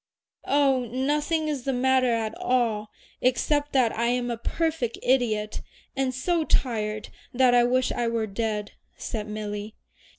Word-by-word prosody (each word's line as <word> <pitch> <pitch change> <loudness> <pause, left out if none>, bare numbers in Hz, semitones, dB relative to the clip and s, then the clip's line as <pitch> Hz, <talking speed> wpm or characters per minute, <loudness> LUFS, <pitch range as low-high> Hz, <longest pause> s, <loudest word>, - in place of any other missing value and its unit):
"Oh, 270 -3 +3
nothing 295 +6 0
is 295 -4 -2
the 270 +2 -1
matter 255 0 +3
at 225 -2 -1
all, 225 -4 0 0.3
except 290 +4 +1
that 250 -4 +3
I 235 +1 +1
am 245 0 0
a - - -1
perfect 310 -1 -1
idiot, 220 -5 +1 0.3
and 270 -1 0
so 325 +6 0
tired 215 -7 -1 0.3
that 255 -1 +5
I 245 0 +6
wish 255 +1 +2
I 240 - -1
were 230 -1 0
dead," 210 0 -3 0.3
said 215 -2 -4
Milly. 210 0 -5
245 Hz, 145 wpm, -26 LUFS, 220-265 Hz, 0.3 s, I